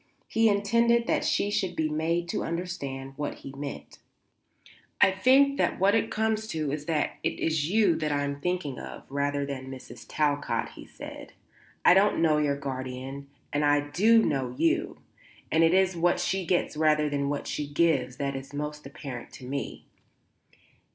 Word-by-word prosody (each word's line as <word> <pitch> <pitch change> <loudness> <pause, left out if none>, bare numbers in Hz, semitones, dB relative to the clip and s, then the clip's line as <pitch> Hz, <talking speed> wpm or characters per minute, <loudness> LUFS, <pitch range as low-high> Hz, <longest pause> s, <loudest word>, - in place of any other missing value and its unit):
He 225 0 +3
intended 230 +4 +3
that - - +1
she 205 - +1
should 200 -4 -1
be 160 - +1
made 165 +3 -1
to - - -1
understand 140 -6 -4
what 145 0 -3
he 135 - -7
meant. 140 0 -7 1.0
"I - - +6
think 270 +8 +4
that - - +1
what 195 +2 +4
it 225 - +2
comes 220 0 0
to 155 -7 -2
is 150 0 -4
that 155 -3 0
it - - -2
is 160 -1 0
you 195 -5 +3
I 145 -2 0
am 140 0 -4
thinking 180 -6 -2
of, - - -9
rather 140 0 0
than 135 -2 -5
of - - -9
Mrs. 130 -1 -10
Talcott," 145 -1 0
he - - -12
said. - - -10 0.5
"I - - +9
don't 195 +3 +4
know 155 -2 +3
your 145 -2 +1
guardian, 130 0 -5 0.3
and 145 +1 +1
I 145 0 +2
do 225 +8 +5
know 130 -3 -1
you, 330 0 +1 0.5
and 160 +1 +4
it 165 +2 +4
is 190 -1 +3
what 175 +1 +2
she 185 0 -1
gets 175 -3 +1
rather 150 -1 +3
than 140 -1 -1
what 145 0 -3
she 150 - -3
gives 145 -5 +1
that 140 0 -2
is 135 +1 -7
most 150 0 -5
apparent 135 -3 -8
to 130 - -10
me." 140 +2 -5
150 Hz, 180 wpm, -27 LUFS, 140-185 Hz, 1.0 s, I